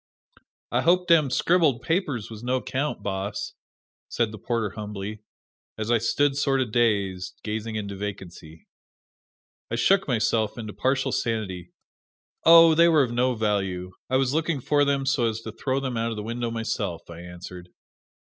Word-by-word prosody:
"I -, -, +2 dB
hope 180 Hz, +1 st, +3 dB
dem 160 Hz, -5 st, +5 dB
scribbled 145 Hz, -3 st, +2 dB
papers 145 Hz, -, -1 dB
was 110 Hz, -1 st, -8 dB
no 130 Hz, +1 st, 0 dB
'count, 140 Hz, +4 st, -3 dB
boss!" 100 Hz, +1 st, -3 dB, 0.6 s
said 115 Hz, -3 st, 0 dB
the 110 Hz, -, -9 dB
porter 115 Hz, -2 st, -2 dB
humbly, 105 Hz, 0 st, -6 dB, 0.6 s
as 110 Hz, +1 st, -2 dB
I 120 Hz, -, +4 dB
stood 135 Hz, +5 st, +1 dB
sort 135 Hz, -1 st, +1 dB
of 125 Hz, -4 st, -1 dB
dazed, 100 Hz, -6 st, 0 dB
gazing 110 Hz, +1 st, -4 dB
into 100 Hz, -2 st, -4 dB
vacancy. 90 Hz, -5 st, -8 dB, 1.0 s
I 115 Hz, -, -2 dB
shook 190 Hz, +12 st, +3 dB
myself 110 Hz, -3 st, 0 dB
into 110 Hz, -3 st, -6 dB
partial 135 Hz, 0 st, 0 dB
sanity. 95 Hz, -8 st, -3 dB, 0.7 s
"Oh, 165 Hz, 0 st, +9 dB
they 170 Hz, +2 st, +5 dB
were 155 Hz, -4 st, +5 dB
of 120 Hz, -, -3 dB
no 125 Hz, +1 st, +1 dB
value 95 Hz, -4 st, -1 dB, 0.2 s
I 130 Hz, -, +3 dB
was 130 Hz, 0 st, +1 dB
looking 160 Hz, -1 st, 0 dB
for 145 Hz, +3 st, +2 dB
them 140 Hz, -1 st, 0 dB
so 135 Hz, -3 st, +2 dB
as 110 Hz, 0 st, -5 dB
to 110 Hz, -, -7 dB
throw 130 Hz, +4 st, -2 dB
them 130 Hz, -3 st, -3 dB
out 115 Hz, +1 st, 0 dB
of 115 Hz, -, -5 dB
the 105 Hz, -, -4 dB
window 120 Hz, +2 st, -3 dB
myself," 100 Hz, -6 st, -3 dB
I 85 Hz, -1 st, -10 dB
answered. 90 Hz, 0 st, -10 dB
115 Hz, 165 wpm, -25 LUFS, 105-135 Hz, 1.0 s, Oh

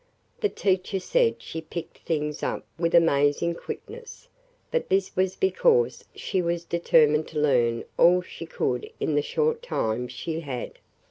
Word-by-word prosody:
The 420 Hz, -, +1 dB
teacher 190 Hz, -, 0 dB
said 485 Hz, -, +2 dB
she 160 Hz, -, -6 dB
picked 160 Hz, +1 st, -8 dB
things 150 Hz, -2 st, -2 dB
up -, -, -3 dB
with 170 Hz, 0 st, +1 dB
amazing 155 Hz, 0 st, +3 dB
quickness, 470 Hz, -, -9 dB, 0.4 s
but 485 Hz, -, -1 dB
this 195 Hz, 0 st, +1 dB
was 185 Hz, 0 st, +1 dB
because 470 Hz, +4 st, +2 dB
she 190 Hz, -, -1 dB
was 170 Hz, 0 st, -2 dB
determined 155 Hz, -3 st, +3 dB
to -, -, -4 dB
learn 120 Hz, -5 st, +2 dB, 0.2 s
all 180 Hz, +1 st, +6 dB
she 165 Hz, -1 st, -9 dB
could 125 Hz, -5 st, -2 dB
in 155 Hz, -, 0 dB
the 145 Hz, -, +3 dB
short 465 Hz, -, 0 dB
time 125 Hz, -, -2 dB
she 155 Hz, +7 st, -4 dB
had. 135 Hz, -6 st, -6 dB
170 Hz, 150 wpm, -26 LUFS, 150-195 Hz, 0.4 s, all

